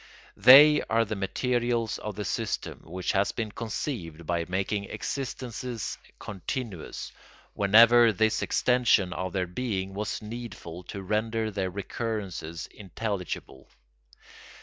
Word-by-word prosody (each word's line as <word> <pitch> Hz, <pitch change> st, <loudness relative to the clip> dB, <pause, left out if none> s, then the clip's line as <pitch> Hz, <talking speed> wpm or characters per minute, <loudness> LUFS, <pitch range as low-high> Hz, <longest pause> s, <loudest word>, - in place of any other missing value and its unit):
They 145 Hz, +4 st, +9 dB
are 115 Hz, 0 st, +3 dB
the 110 Hz, -, -3 dB
materials 120 Hz, +3 st, -1 dB
of 105 Hz, -2 st, -5 dB
the 105 Hz, -, -4 dB
system, 115 Hz, -2 st, -3 dB
which 90 Hz, +2 st, -3 dB
has 100 Hz, +1 st, +2 dB
been 110 Hz, -2 st, -4 dB
conceived 100 Hz, -, -5 dB
by 85 Hz, 0 st, -1 dB
making 100 Hz, +2 st, -1 dB
existences 125 Hz, -3 st, -4 dB, 0.2 s
continuous, 105 Hz, -, -5 dB, 0.4 s
whenever 115 Hz, +3 st, +6 dB
this 110 Hz, +2 st, +1 dB
extension 120 Hz, -7 st, +2 dB
of 90 Hz, 0 st, -3 dB
their 95 Hz, -1 st, -1 dB
being 95 Hz, -1 st, -3 dB
was 105 Hz, +1 st, -3 dB
needful 110 Hz, -6 st, -8 dB
to 100 Hz, +1 st, -7 dB
render 110 Hz, +2 st, -1 dB
their 95 Hz, -2 st, -2 dB
recurrences 95 Hz, -4 st, -4 dB
intelligible. 95 Hz, -8 st, -5 dB
105 Hz, 115 wpm, -27 LUFS, 95-115 Hz, 0.4 s, They